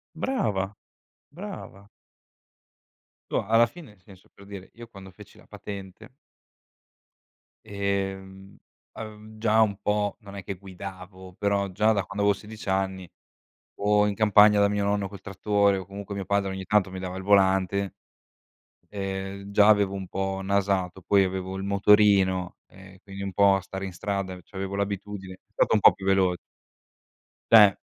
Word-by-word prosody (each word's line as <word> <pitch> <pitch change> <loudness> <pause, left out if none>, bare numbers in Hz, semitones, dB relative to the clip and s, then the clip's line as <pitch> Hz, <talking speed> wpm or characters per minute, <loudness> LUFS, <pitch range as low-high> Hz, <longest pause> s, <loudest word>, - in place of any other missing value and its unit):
Brava, 105 - -2 0.5
brava. 165 - -10 1.4
Tu - - -2
alla 115 +3 +4
fine, 165 0 -13
nel 100 -3 -24
senso 95 0 -18
per 100 - -16
dire, 100 -2 -10
io 120 0 -11
quando 95 -4 -13
feci - - -16
la - - -19
patente 100 +4 -10 1.5
Ehm, 95 -1 -4 0.3
uhm, 110 0 -10
già 110 0 +3
un 105 -3 +1
po' 105 -1 -1
non 100 -2 -12
è 95 - -7
che 100 - -5
guidavo, 95 0 -10
però 100 -1 0
già 110 +4 +2
da 100 - 0
quando 100 +2 -4
avevo 100 - +4
16 105 +1 -11
anni, 95 -2 -2 0.7
o 105 0 +2
in 105 - -1
campagna 105 0 +5
da 100 - +5
mio 105 0 -1
nonno 100 -1 0
col 100 -1 -11
trattore 100 0 +1
o 95 - -6
comunque 100 +1 -8
mio 100 -1 -5
padre 100 0 0
ogni 95 0 -6
tanto 105 -2 +2
mi 95 - -6
dava 95 0 -5
il 95 - -6
volante. 95 0 +2 1.1
Ehm, 95 0 -5
già 105 +1 +5
avevo 100 -2 +3
un 95 -2 -6
po' 95 +1 -3
nasato, 95 -2 0
poi 100 +2 +3
avevo 95 0 -3
il 95 - -5
motorino 100 -2 +3
e 95 0 -16
quindi 100 0 -8
un 95 - -5
po' 100 +1 +5
a 95 - -2
stare 95 +1 -6
in 95 - -6
strada, 100 -1 -4
c'avevo 95 +2 -6
l'abitudine, 100 -1 -4
è 100 +3 -21
stato - - +1
un 105 - +4
po' - - +7
più 95 - -10
velo 95 -2 +3 1.2
Cioè, 105 -4 +8
100 Hz, 160 wpm, -26 LUFS, 95-105 Hz, 1.5 s, Cioè